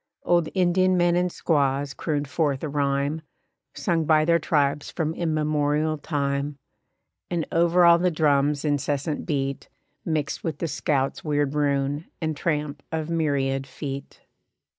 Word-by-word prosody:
Old 175 -2 +2
Indian 185 0 +3
men 175 0 +3
and 180 0 +1
squaws 140 -4 0
crooned 145 -1 -2
forth 140 0 -1
a - - -1
rhyme 140 +2 0 0.5
Sung 170 -5 0
by 155 0 +4
their 170 +1 +4
tribes 145 -2 0
from 160 -2 -2
immemorial 155 -1 0
time; 140 -1 -2 0.7
And 170 -2 -1
over 170 +1 +4
all 170 0 +7
the 180 +1 +2
drums' 150 -2 +2
incessant 145 +1 -1
beat 140 -3 -2 0.3
Mixed 155 -3 -2
with 160 -3 -3
the 165 - -2
scout's 140 -2 -1
weird 145 -2 0
rune, 145 +1 0
and 160 -2 -2
tramp 150 -2 -2
of 160 0 -3
myriad 135 -4 0
feet. 135 +1 -7
150 Hz, 140 wpm, -25 LUFS, 140-165 Hz, 0.7 s, all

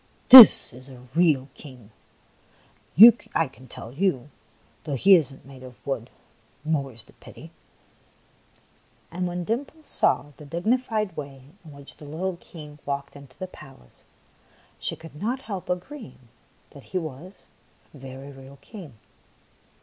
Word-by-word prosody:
This 255 - +10
is 130 +2 -14
a 125 -1 -15
real 155 -6 +2
King, 125 -7 -15 1.4
I 165 - +1
can 130 -1 -18
tell 115 0 -11
you, 145 -5 -2 0.5
though 145 - -4
he 195 +10 +5
is 160 -7 +3
n't 135 - -17
made 135 -1 -14
of 125 -2 -14
wood, 130 -4 -4 0.6
more 145 -4 -2
's 115 - -11
the - - -23
pity! - - -15 0.8
" - - -36
And 180 +2 -3
when 175 0 -5
Dimples 280 - -6
saw 145 - 0
the - - -13
dignified 215 - -2
way 140 -3 -9 0.2
in 160 - -14
which 140 0 -12
the 150 - -13
little 170 +5 -5
King 150 -4 -13
walked 140 0 -5
into 140 -2 -16
the 185 - -6
pal 155 - -15
ace, - - -28 0.8
she - - -4
could 165 -2 -14
not 250 +5 -3
help 195 -4 -7
agreeing 180 - -8 0.4
that - - -15
he - - -5
was 165 +2 -7 0.6
a - - -14
very 135 +1 -11
real 135 0 -15
King. 180 - -13
150 Hz, 150 wpm, -24 LUFS, 135-185 Hz, 1.4 s, This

